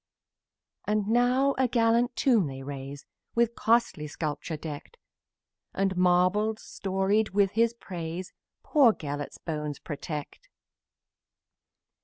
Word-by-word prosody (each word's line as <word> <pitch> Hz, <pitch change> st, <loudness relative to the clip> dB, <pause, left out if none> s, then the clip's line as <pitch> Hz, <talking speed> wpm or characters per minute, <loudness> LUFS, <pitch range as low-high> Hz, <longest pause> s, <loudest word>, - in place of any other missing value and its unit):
And 210 Hz, -1 st, +1 dB
now 250 Hz, +4 st, +3 dB
a 260 Hz, -, +4 dB
gallant 235 Hz, +1 st, +2 dB
tomb 230 Hz, -, +3 dB
they 135 Hz, -1 st, -7 dB
raise, 140 Hz, 0 st, -7 dB, 0.3 s
With 235 Hz, 0 st, +2 dB
costly 230 Hz, -11 st, +1 dB
sculpture 150 Hz, +1 st, -4 dB
decked, 150 Hz, -, -8 dB, 0.8 s
And 195 Hz, -1 st, +1 dB
marbles, 185 Hz, +5 st, +2 dB
storied 195 Hz, +3 st, 0 dB
with 200 Hz, -2 st, +4 dB
his 230 Hz, +2 st, +2 dB
praise, 175 Hz, -4 st, -6 dB, 0.3 s
Poor 270 Hz, -8 st, +5 dB
Gelert's 145 Hz, -3 st, -5 dB
bones 150 Hz, -3 st, -4 dB
protect. 150 Hz, -, -7 dB
195 Hz, 105 wpm, -28 LUFS, 150-230 Hz, 0.8 s, Poor